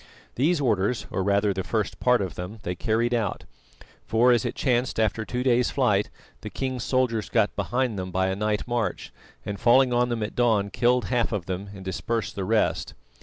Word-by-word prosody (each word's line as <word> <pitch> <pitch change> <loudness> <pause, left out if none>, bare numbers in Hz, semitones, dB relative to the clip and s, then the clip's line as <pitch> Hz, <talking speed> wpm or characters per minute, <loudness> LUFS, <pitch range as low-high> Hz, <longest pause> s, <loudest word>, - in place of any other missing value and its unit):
These 155 +6 +1
orders, 115 -3 0
or - - -1
rather 100 +1 +2
the 95 0 -3
first 110 -1 -2
part 125 -4 +3
of 95 - -5
them, 90 +5 -7
they 90 - -2
carried 115 +6 0
out, 110 -5 -1 0.6
for 120 +3 +3
as 120 -3 +2
it - - -3
chanced 125 -3 0
after 110 0 +1
two 125 +2 -3
days' 125 -1 +3
flight, - - +1 0.3
the - - -6
king's 130 0 -3
soldiers 125 -4 0
got 110 -3 +1
behind 125 -4 -1
them 95 0 -4
by 95 +1 0
a 95 - -1
night 105 +2 -1
march, 120 -2 -2 0.3
and 100 - -4
falling 125 +1 +4
on 120 0 +2
them 115 -2 -2
at 105 - -5
dawn, 110 -5 +2
killed 125 -1 +2
half 120 +1 0
of 100 -6 -2
them 95 +3 -4
and 95 -1 -10
dispersed 115 +4 -2
the 95 - -3
rest. 110 +2 0
115 Hz, 200 wpm, -25 LUFS, 100-125 Hz, 0.6 s, falling